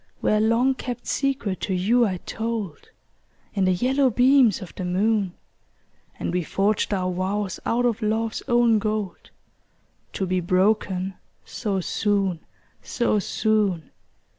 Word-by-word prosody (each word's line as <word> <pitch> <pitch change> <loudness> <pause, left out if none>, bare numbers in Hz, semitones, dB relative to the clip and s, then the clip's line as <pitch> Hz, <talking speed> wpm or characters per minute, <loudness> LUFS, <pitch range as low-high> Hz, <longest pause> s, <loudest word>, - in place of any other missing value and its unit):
Where 215 - +2
a - - +2
long 230 +5 +3
kept 250 -2 -6
secret 265 -9 -1
to 190 - -2
you 230 +6 +3
I 185 -2 -2
told, 220 -7 -4 0.6
In 195 -2 +1
the 185 - +3
yellow 260 +8 +2
beams 250 -2 +4
of 185 - -10
the 185 - -6
moon, 195 +1 +1 0.8
And - - -3
we 180 - +1
forged 200 +6 0
our 185 -2 0
vows 190 +2 -2
out 245 +2 +1
of 235 -2 0
love's 220 +1 -1
own 240 -3 +4
gold, 210 -3 -3 0.8
To 190 - -2
be 185 0 0
broken 185 +1 +1 0.3
so 195 -3 -2
soon, 195 -3 0 0.4
so 235 -3 0
soon! 205 -7 0
210 Hz, 140 wpm, -24 LUFS, 185-230 Hz, 0.8 s, beams